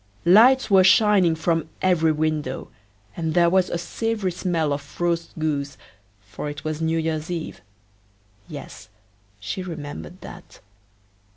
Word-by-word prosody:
Lights 230 +7 +6
were 190 -1 +7
shining 190 -3 +4
from 165 -1 -1
every 170 -4 +2
window, 150 -3 -2 0.5
and 160 -2 -3
there 170 -1 +4
was 185 -1 +2
a - - -2
savory 205 +3 -2
smell 170 -4 -1
of 145 0 -8
roast 170 -1 -1
goose, 145 -3 -2 0.4
for 105 +9 -7
it 145 -1 -8
was 155 0 -4
New 160 0 0
year's 160 0 -2
eve 170 - -5 0.9
yes, - - -10 0.5
she 100 - -5
remembered 145 - -8
that. - - -12
165 Hz, 130 wpm, -23 LUFS, 155-180 Hz, 0.9 s, were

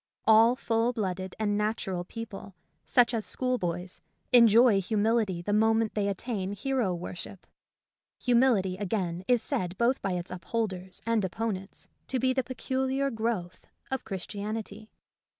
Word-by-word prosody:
All 225 +2 +6
full 230 -1 0
blooded 190 -4 -3
and 210 -2 0
natural 205 -4 -1
people, 200 -1 -8 0.3
such 245 -1 +4
as 225 -2 0
school 255 +2 -1
boys, 175 +1 -4 0.3
enjoy 230 -3 +7
humility 210 -3 +1
the 205 - -1
moment 220 +1 +3
they 205 -1 0
at 200 -2 -1
tain 200 -5 -3
hero 240 0 0
worship. 180 +2 -8 0.7
Humility, 235 -7 +2
again, 185 -3 -2
is 245 -2 +3
said 180 0 -1
both 240 +3 +2
by 195 - -1
its 175 0 -4
upholders 185 -1 -4
and 230 -2 +1
opponents 195 0 -4 0.2
to 265 - -1
be 255 +1 +2
the 260 - +1
peculiar 265 +2 -1
growth 220 -6 -3 0.2
of 265 - -2
Christianity. 210 +2 -5
215 Hz, 140 wpm, -28 LUFS, 190-235 Hz, 0.7 s, enjoy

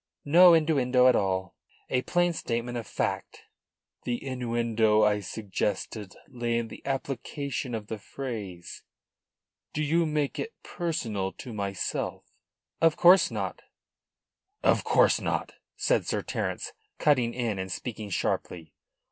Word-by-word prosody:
"No 170 +4 +8
innuendo 135 -6 +3
at 130 - +6
all. 95 -1 0 0.3
A 125 - +1
plain 175 +4 +1
statement 120 -4 -3
of 115 -3 -4
fact." - - -3 0.6
"The 120 +2 -3
innuendo 115 -4 +2
I 105 -1 +3
suggested 105 0 -3
lay 120 -4 -1
in 115 -1 -2
the - - -11
application 135 -1 -3
of 110 -2 -5
the 110 0 -6
phrase. 105 -9 -6 0.9
Do 155 - -1
you 165 +3 +2
make 150 -2 -1
it 455 - -4
personal 110 - -2
to 120 - -9
myself?" 100 -2 -3 0.6
"Of 165 -1 +4
course 180 +2 +7
not," - - -4 2.1
said - - +1
Sir - - -1
Terence, - - -3 0.2
cutting 125 -6 +2
in 115 -6 -1
and 95 0 -4
speaking 110 0 -5
sharply. 85 -3 -2
120 Hz, 120 wpm, -28 LUFS, 105-145 Hz, 2.1 s, No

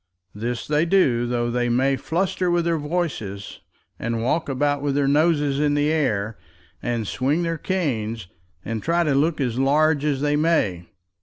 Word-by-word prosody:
This 115 +3 -4
they 150 +1 +2
do, 130 -11 +3
though 120 -1 -1
they 120 0 0
may 135 +3 +2
fluster 180 +6 -1
with 175 -1 +1
their 165 -2 +1
voices, 145 - -4 0.4
and 115 0 -2
walk 155 +6 0
about 145 +1 0
with 140 -1 -1
their 140 -1 +2
noses 145 -1 +2
in 145 -1 +2
the 145 +1 +2
air, 110 -9 -1 0.4
and 120 -2 -2
swing 140 - 0
their 165 -1 -2
canes, 115 - -2 0.4
and 115 -1 -3
try 170 +5 +1
to 150 -4 +1
look 150 +4 +1
as 125 -3 -1
large 145 +2 +3
as 145 -3 0
they 145 0 +1
may. 150 - +1
145 Hz, 170 wpm, -23 LUFS, 120-160 Hz, 0.4 s, do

